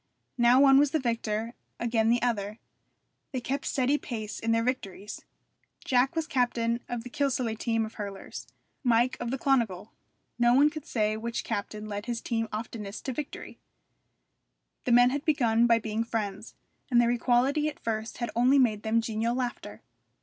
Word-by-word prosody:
Now 240 +2 +6
one 270 -1 +7
was 290 0 +4
the 315 - 0
victor, 230 -2 -2 0.3
again 225 -1 +1
the 240 0 +2
other. 215 -3 -1 0.7
They 260 - -2
kept 270 +3 -3
steady 275 +2 +1
pace 215 -3 -5
in 230 - -1
their 230 0 +2
victories. 210 -5 -4 0.6
Jack 255 +3 +2
was 325 -1 0
captain 240 -6 0
of 240 -2 -3
the 245 - -8
Kilsallagh 250 -6 -1
team 225 -1 0
of 220 - -9
hurlers, 200 -2 -7 0.4
Mike 240 0 +3
of 240 - -3
the 265 - -2
Clonegall. 230 -8 0 0.5
No 240 0 +5
one 290 +3 +5
could 310 -2 -8
say 215 -2 0
which 235 +1 -3
captain 210 -1 -4
led 205 +2 -5
his 240 -1 -2
team 225 -1 -2
oftenest 215 -1 -6
to 265 - -2
victory. 295 +2 -7 1.3
The 250 - +1
men 245 +1 +6
had 285 +1 -2
begun 240 -7 +3
by 230 -1 +5
being 220 0 -2
friends, 215 -2 -4 0.3
and 240 -2 +4
their 240 0 +4
equality 255 +5 +2
at 305 - -5
first 220 0 -3
had 240 -1 -3
only 250 +4 +4
made 225 -6 +3
them 225 +1 +1
genial 225 +1 -1
laughter. 250 -2 -4
235 Hz, 170 wpm, -28 LUFS, 220-255 Hz, 1.3 s, one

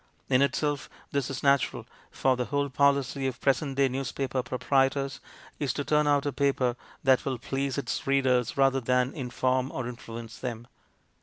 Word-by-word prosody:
In 130 0 +4
itself 140 +1 0 0.2
this 140 -2 -1
is 135 -3 -5
natural, 140 -2 +2 0.2
for 130 -1 +1
the 125 0 -2
whole 145 +1 -1
policy 140 0 +2
of 130 -2 -4
present 135 0 +1
day 140 -1 +4
newspaper 130 0 -2
proprietors 135 +2 0 0.4
is 140 -5 0
to 145 - -2
turn 150 +1 +2
out 145 -1 +3
a 145 - -1
paper 135 -4 +1 0.3
that 130 -2 +4
will 135 -2 -2
please 135 +2 -2
its 140 - -3
readers 130 -4 +2
rather 135 -1 +3
than 125 +1 +1
in 130 -4 -5
form 130 +1 0
or 130 -2 -4
influence 115 -2 -8
them. 120 -2 -5
135 Hz, 170 wpm, -28 LUFS, 125-140 Hz, 0.4 s, In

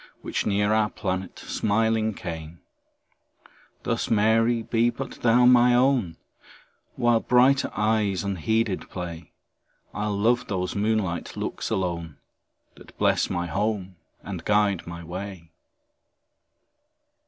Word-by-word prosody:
Which - - -2
near 105 +1 +2
our 110 -1 +2
planet 95 -2 -4
smiling 110 0 0
came; 80 -1 -7 1.2
Thus, - - -1
Mary, 115 +2 +3
be 115 +1 +2
but 125 +3 -7
thou 120 +1 +4
my 125 0 +6
own; 125 -10 +2 0.8
While 120 -1 +3
brighter 130 +4 +3
eyes 105 -3 +1
unheeded 100 +2 -1
play, 85 -2 -7 0.6
I'll 105 0 -2
love 120 +4 +2
those 90 -2 -2
moonlight 105 -4 -1
looks - - -4
alone, 85 -5 -3 0.6
That - - -17
bless - - +2
my 85 0 -2
home 100 +1 -2 0.3
and 95 -5 -6
guide 105 -3 +1
my 85 0 -7
way. 90 -1 -7
105 Hz, 110 wpm, -25 LUFS, 90-115 Hz, 1.2 s, my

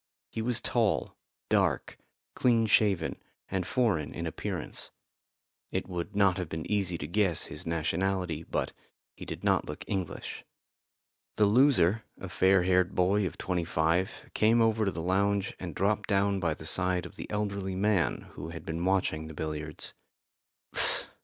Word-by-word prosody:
He 115 - -3
was 120 0 +1
tall, - - +1 0.3
dark, - - +1 0.3
clean 115 -3 +3
shaven 100 -6 +3 0.3
and 95 -2 -1
foreign 105 - +1
in 85 - -3
appearance. 80 - -4 0.8
It - - -2
would 90 +2 -4
not 100 -3 +4
have 90 -4 -3
been 80 -1 -4
easy 95 -5 0
to 75 - -5
guess 90 -1 +1
his - - -8
nationality, 85 +1 0
but - - -2 0.4
he - - -9
did - - -6
not - - +3
look - - -6
English. 95 -4 -4 0.9
The 105 - +4
loser, 115 -3 +4 0.2
a 95 - -6
fair 95 +1 +4
haired 90 0 +2
boy 95 +2 +3
of - - -8
twenty 90 -2 -1
five, 80 +3 0
came 110 +2 +4
over 110 -1 +3
to 95 - +1
the 80 - -5
lounge 100 +2 +1
and 85 -5 -6
dropped 105 +2 +1
down 100 -1 +2
by 80 -4 0
the 80 - -10
side 90 +2 +1
of - - -10
the - - -7
elderly 100 -2 -2
man 100 -3 +2
who 75 +3 -7
had 80 -1 -8
been 80 +1 -3
watching 90 -4 +1
the 80 - -9
billiards. 75 0 -5
95 Hz, 160 wpm, -30 LUFS, 85-100 Hz, 0.9 s, not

